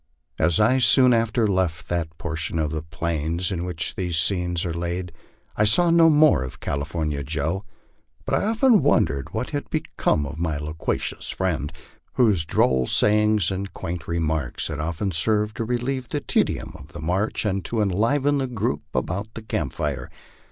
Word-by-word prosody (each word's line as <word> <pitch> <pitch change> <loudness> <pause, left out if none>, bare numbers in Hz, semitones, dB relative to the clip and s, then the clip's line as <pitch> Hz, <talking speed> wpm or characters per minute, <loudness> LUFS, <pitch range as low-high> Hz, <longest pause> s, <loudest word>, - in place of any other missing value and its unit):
As 80 0 +2
I 120 +5 +4
soon 125 +1 +5
after 115 0 +2
left 95 -5 -1
that 80 -2 -2
portion 80 0 -2
of 75 -2 0
the 80 -1 -3
plains 85 +2 -2
in 85 -2 -2
which 85 -3 -3
these 90 -3 -2
scenes 90 0 +1
are 85 - -2
laid, 85 +1 -3 0.4
I 105 - +2
saw 170 - +4
no 165 -1 +6
more 150 - +5
of 65 -1 -6
California 75 0 -2
Joe; 80 +7 -2 0.6
but - - -3
I - - +2
often 225 0 +4
wondered 70 -2 +1
what - - -3
had - - -4
become 75 - 0
of 75 +3 -7
my 80 -3 -1
loquacious 75 +2 -3
friend, 80 -6 -1 0.4
whose 105 -10 +3
droll 65 -5 +2
sayings 105 -3 +3
and 95 +1 -4
quaint 85 -1 -5
remarks 80 -6 -1
had 75 -2 -4
often 85 +5 -2
served 105 +5 +2
to 115 - -2
relieve 125 +2 -2
the - - -1
tedium - - -1
of - - -14
the - - -7
march 90 +9 -1
or 100 -1 0
to 110 +6 -2
enliven 130 +9 +1
the 135 - -1
group 105 - -2
about 100 +5 -2
the 115 - -7
camp 75 - -2
fire. 70 -4 -3
90 Hz, 175 wpm, -24 LUFS, 80-110 Hz, 0.6 s, no